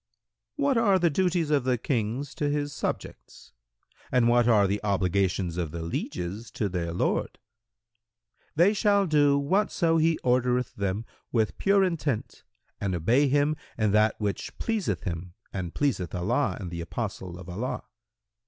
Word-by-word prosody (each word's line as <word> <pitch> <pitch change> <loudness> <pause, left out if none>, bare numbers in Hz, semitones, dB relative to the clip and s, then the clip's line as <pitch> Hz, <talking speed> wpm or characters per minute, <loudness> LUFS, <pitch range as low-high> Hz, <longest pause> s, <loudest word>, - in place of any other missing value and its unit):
Q 290 - -2
"What 280 -3 +3
are 200 -4 +4
the 170 -2 +2
duties 175 -1 +1
of 145 -3 +3
the 125 -1 +1
King 120 +1 -1
to 145 - 0
his 145 0 -1
subjects - - -6 0.6
and 125 -2 +4
what 120 0 +4
are 105 -4 +5
the 100 +2 -1
obligations 95 -3 0
of 85 -3 -1
the 85 +2 -5
lieges 90 +6 -4
to 105 - -1
their 90 -3 -3
lord?"—"They 110 - -3
shall 205 -1 +3
do 145 -4 +4
whatso 165 +1 +2
he 160 0 +3
ordereth 125 -1 +1
them 100 +2 -2 0.3
with 110 -3 0
pure 195 0 +4
intent 155 - -2 0.4
and 95 -3 -1
obey 120 - +3
him 145 +2 +2 0.2
in 110 -2 +2
that 105 +1 +3
which 105 -2 -3
pleaseth 225 -4 -1
him 90 -1 -5 0.2
and 90 -3 -4
pleaseth 105 - -1
Allah 100 +11 0
and 90 -4 -6
the 85 -1 -4
Apostle 95 -2 -5
of 90 -1 -10
Allah. 105 +9 -4
115 Hz, 155 wpm, -27 LUFS, 95-145 Hz, 0.6 s, are